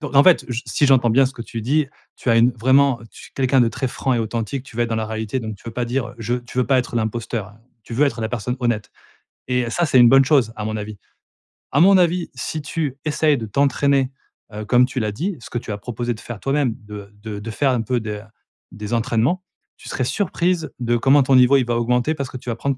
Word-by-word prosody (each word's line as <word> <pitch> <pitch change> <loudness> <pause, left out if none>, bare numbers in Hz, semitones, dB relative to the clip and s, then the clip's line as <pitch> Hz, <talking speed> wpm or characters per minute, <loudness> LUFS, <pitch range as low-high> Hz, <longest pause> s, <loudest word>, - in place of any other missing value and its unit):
Donc, 145 -3 -4
en 140 - +8
fait, 185 - +5
j 120 +1 -3
si 145 - +1
j'entends 125 -4 +4
bien 135 +3 +4
ce 130 - -6
que 120 -3 -7
tu 115 -1 -6
dis, 145 +4 +1 0.3
tu - - -6
as 115 - +5
une 115 +2 +5
vraiment 130 +2 +3
tu - - -14
es - - -44
quelqu'un 130 -1 +2
de 115 - +4
très 130 +4 -3
franc 130 +1 -2
et - - 0
authentique. 115 +4 -3
Tu 115 - -14
veux 120 - +2
être 120 - -1
dans 115 - 0
la 110 -1 -2
réalité, 110 +2 -3
donc 110 -2 -6
tu - - -22
veux 115 - -5
pas 125 +1 -2
dire 120 +1 -2
heu: - - -12
«Je» 115 +2 -2
tu 125 - -7
veux 125 - +2
pas 135 -2 +3
être 125 -1 -2
l'imposteur. 110 -2 -3 0.3
Tu 115 - -7
veux 145 +5 +3
être 130 - -3
la 110 - -1
personne 125 +2 -3
honnête. 115 -4 -1 0.6
Et 125 -2 0
ça, 175 +6 +1
c'est 130 -2 +3
une 120 -1 +8
bonne 135 +1 +6
chose, 130 -6 +3
à 105 - -4
mon 110 0 -3
avis. 105 -1 -6 0.7
À 140 - +2
mon 190 +2 +7
avis, 175 0 +1
si 155 +4 -4
tu 145 -2 -3
essayes 150 -1 +2
de 115 - -5
t'entraîner, 140 +3 +1 0.4
heu, 105 0 -6
comme 125 +2 +4
tu 130 0 -4
l'as 105 -2 -1
dit- 170 - -3
ce 115 - -11
que - - -3
tu 115 - -5
as 105 - -3
proposé 120 +2 -3
de 110 - -11
faire 115 -3 -8
toi-même 135 -4 0
de 105 -1 -9
de 105 -2 -5
de 115 +2 -6
faire 135 +4 +1
un 120 -3 0
peu 120 +2 -1
de 105 -1 -5 0.5
des 105 +2 -6
entraînements- 120 +9 +1 0.3
tu - - -12
serais 130 - -2
surprise 175 - -1
de 120 -1 +1
comment 135 +4 +4
ton 130 0 +3
niveau, 130 +2 +6
il 130 - +1
va 120 - -1
augmenter, 125 +5 +1
parce 140 -4 -4
que 130 - -7
tu 125 - -8
vas 115 - -1
prendre 135 +2 -2
125 Hz, 265 wpm, -21 LUFS, 115-135 Hz, 0.7 s, en